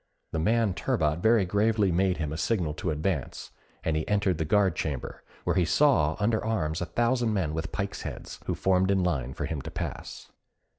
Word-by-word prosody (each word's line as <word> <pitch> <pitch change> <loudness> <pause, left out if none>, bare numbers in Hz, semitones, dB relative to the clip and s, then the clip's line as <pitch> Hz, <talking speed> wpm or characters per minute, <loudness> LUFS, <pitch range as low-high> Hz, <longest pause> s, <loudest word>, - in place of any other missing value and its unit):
The 80 - -2
man 110 +3 +2
turbot 85 - 0
very 110 +1 +4
gravely 105 +1 +2
made 90 +1 +2
him 75 -2 -3
a - - -3
signal 85 -4 0
to 85 - -3
advance, 75 -1 -2 0.3
and 80 - 0
he 80 - -1
entered 100 -5 +1
the 80 - 0
guard 95 0 +3
chamber, 70 -5 -4 0.2
where - - 0
he 90 - +3
saw 85 - +3
under 110 +1 +1
arms 90 -8 -1
a 90 - -2
thousand 120 +3 +1
men 85 -6 0
with 80 0 -3
pikes' 100 -1 -3
heads, - - -7
who - - 0
formed 95 0 +2
in 95 -2 +2
line 65 -7 -1
for - - -3
him 80 -4 -3
to - - -7
pass. - - -6
95 Hz, 200 wpm, -28 LUFS, 80-105 Hz, 0.3 s, very